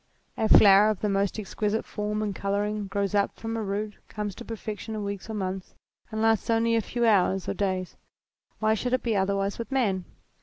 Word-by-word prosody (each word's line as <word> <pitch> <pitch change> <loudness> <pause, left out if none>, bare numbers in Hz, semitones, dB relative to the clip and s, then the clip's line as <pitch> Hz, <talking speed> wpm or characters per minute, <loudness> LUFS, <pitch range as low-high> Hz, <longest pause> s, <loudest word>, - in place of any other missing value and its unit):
A 220 - 0
flower 200 +1 +8
of 215 - -2
the 210 - +1
most 200 +1 0
exquisite 215 +1 -2
form 210 0 -2
and 205 -2 -2
colouring 205 +1 -1
grows 200 0 -1
up 200 -1 +1
from 225 0 -4
a 225 - -2
root, 210 +1 -3
comes 210 -2 -4
to - - -9
perfection 220 0 -6
in 210 - -3
weeks 200 +2 -5
or 220 - -4
months, 190 -2 -4 0.3
and 220 0 -2
lasts 225 -1 +2
only 230 0 +3
a 225 - +3
few 240 +3 -1
hours 195 -3 +3
or - - 0
days. 185 -2 -2 0.6
Why 215 0 +2
should 245 +3 -2
it 255 - +1
be 230 -3 0
otherwise 195 +1 0
with 230 - -5
man 200 -9 +1
210 Hz, 205 wpm, -27 LUFS, 200-220 Hz, 0.6 s, flower